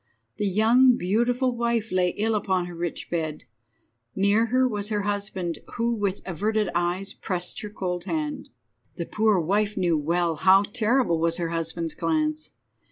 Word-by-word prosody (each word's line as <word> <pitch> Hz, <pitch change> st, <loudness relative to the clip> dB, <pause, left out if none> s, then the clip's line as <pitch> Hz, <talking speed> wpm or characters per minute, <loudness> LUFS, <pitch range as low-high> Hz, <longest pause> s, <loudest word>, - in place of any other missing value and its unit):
The 210 Hz, -, 0 dB
young, 235 Hz, +6 st, +5 dB
beautiful 240 Hz, +7 st, +1 dB
wife 235 Hz, -2 st, -1 dB
lay 185 Hz, -1 st, +2 dB
ill 220 Hz, +2 st, +1 dB
upon 190 Hz, -4 st, 0 dB
her 175 Hz, -, -8 dB
rich 170 Hz, 0 st, -5 dB
bed. 160 Hz, -3 st, -2 dB, 0.7 s
Near 205 Hz, +4 st, +3 dB
her 255 Hz, +2 st, +3 dB
was 210 Hz, -3 st, -3 dB
her 210 Hz, -2 st, 0 dB
husband, 200 Hz, -4 st, -3 dB, 0.2 s
who, 235 Hz, 0 st, 0 dB
with 200 Hz, -3 st, -2 dB
averted 210 Hz, +3 st, 0 dB
eyes, 175 Hz, +3 st, -1 dB
pressed 180 Hz, -2 st, -2 dB
her 210 Hz, -, -6 dB
cold 180 Hz, -4 st, -4 dB
hand. 305 Hz, -2 st, -3 dB, 0.5 s
The 170 Hz, -, -4 dB
poor 215 Hz, -1 st, +2 dB
wife 205 Hz, +5 st, 0 dB
knew 175 Hz, -4 st, +2 dB
well 170 Hz, +1 st, 0 dB
how 190 Hz, +4 st, +5 dB
terrible 220 Hz, -3 st, +1 dB
was 165 Hz, 0 st, +1 dB
her 170 Hz, -2 st, -2 dB
husband's 165 Hz, -1 st, -3 dB
glance. 155 Hz, -2 st, -1 dB
195 Hz, 160 wpm, -25 LUFS, 175-220 Hz, 0.7 s, young